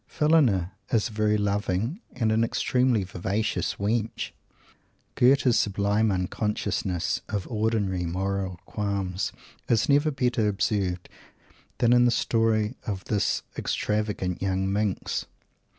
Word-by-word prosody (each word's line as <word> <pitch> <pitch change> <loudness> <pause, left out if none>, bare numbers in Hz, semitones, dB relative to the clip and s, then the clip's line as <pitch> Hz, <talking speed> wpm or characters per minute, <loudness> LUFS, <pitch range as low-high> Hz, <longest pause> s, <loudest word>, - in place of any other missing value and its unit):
Phillina 130 - +3 0.2
is 115 0 +1
a - - -12
very 105 0 +1
loving 105 - -1
and 115 -3 0
an 110 +1 +3
extremely 125 -1 +1
vivacious 95 +3 -2
wench. 110 +2 -1 0.8
Goethe's 130 -1 +4
sublime 105 +2 +1
unconsciousness 95 -1 -1
of 100 -3 -3
ordinary 105 -5 0
moral 95 0 -2
qualms 100 -3 -2 0.4
is 115 -3 +3
never 145 +2 +4
better 125 -6 +1
observed 100 -3 -1 0.7
than 120 0 +4
in 120 0 +5
the - - +5
story 115 -2 +1
of 95 -3 -3
this 100 -2 0 0.2
extravagant 105 -4 -1
young 95 0 0
minx. 105 -2 -1
105 Hz, 115 wpm, -26 LUFS, 95-115 Hz, 0.8 s, in